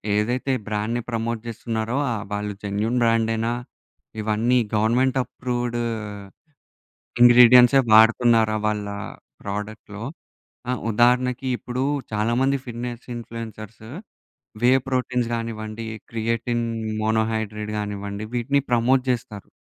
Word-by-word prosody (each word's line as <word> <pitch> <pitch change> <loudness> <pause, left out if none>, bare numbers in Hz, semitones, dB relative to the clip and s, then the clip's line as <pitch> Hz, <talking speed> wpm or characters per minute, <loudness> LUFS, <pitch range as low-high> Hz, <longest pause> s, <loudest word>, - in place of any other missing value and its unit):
ఏదైతే 125 +6 0 0.2
బ్రాండ్‌ని 110 +3 -1
ప్రమోట్ 115 0 -2
చేస్తున్నారో 115 +1 -3
ఆ - - 0 0.2
వాళ్ళు 105 0 -3
జెన్యూన్ 105 +4 -1
బ్రాండేనా? 115 0 +1 0.7
ఇవన్నీ 110 +4 +1 0.2
గవర్నమెంట్ 125 +5 +2
అప్రూవ్‌డ్ 120 0 -3 1.4
ఇంగ్రీడియెంట్స్ 125 +1 +8 0.2
వాడుతున్నారా 110 0 +5
వాళ్ళ 105 -1 -1 0.6
ప్రోడక్ట్‌లో. 105 +1 -6 0.7
ఆ - - +2 0.2
ఉదాహరణకి 125 +3 +2
ఇప్పుడు 125 +2 -3 0.3
చాలా 105 +2 0
మంది 135 +1 +2
ఫిట్నెస్ 120 0 -6
ఇన్‌ఫ్లుయెన్సర్స్ 115 -2 -8 0.8
వే 125 - +6 0.2
ప్రోటీన్స్ 125 -2 0
కానివ్వండి, 115 -1 -5 0.3
క్రియేటిన్ 115 +1 -1 0.4
మోనో 110 +1 +2
హైడ్రేట్ 105 -1 -3
గానివ్వండి 100 0 -4
వీటిని 140 +4 +1
ప్రమోట్ 125 +2 +3
చేస్తారు. 110 -4 -4
115 Hz, 100 wpm, -23 LUFS, 110-120 Hz, 1.4 s, ఇంగ్రీడియెంట్స్